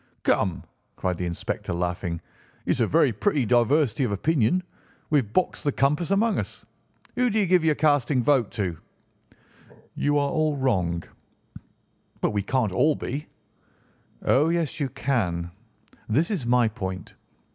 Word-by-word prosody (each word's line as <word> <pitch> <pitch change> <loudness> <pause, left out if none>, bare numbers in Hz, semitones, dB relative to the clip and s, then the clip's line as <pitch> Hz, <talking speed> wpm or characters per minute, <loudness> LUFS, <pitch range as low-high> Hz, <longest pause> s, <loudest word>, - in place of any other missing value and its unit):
"Come," - - +1 0.3
cried 90 -2 -2
the 90 - -1
inspector, 85 0 -4
laughing; 90 -1 -2 0.4
"it's - - 0
a 115 - +3
very 145 -4 +3
pretty 140 - +1
diversity 125 +3 +2
of 120 - 0
opinion. 145 - +1 0.5
We 150 - +5
have 110 -6 -5
boxed 185 - 0
the 145 - +1
compass 150 +6 +1
among 205 +3 +2
us. - - -6 0.5
Who 250 0 +2
do 220 - -1
you 205 - +3
give 180 -1 +3
your 155 -2 +3
casting 145 -4 +2
vote 130 -5 +3
to?" 95 -8 -3 1.1
"You 145 0 +1
are 140 -1 +1
all 155 -2 +1
wrong." 90 -11 0 1.2
"But - - +1
we 105 -1 0
can't 115 0 0
all 150 +11 +3
be." 145 +4 -5 1.0
"Oh, 145 +5 +4
yes, 170 -3 -1
you 140 -3 -1
can. 90 -11 -1 0.6
This 155 - +2
is 160 - -2
my 120 -1 +4
point." 95 -4 -5
130 Hz, 150 wpm, -25 LUFS, 100-155 Hz, 1.2 s, We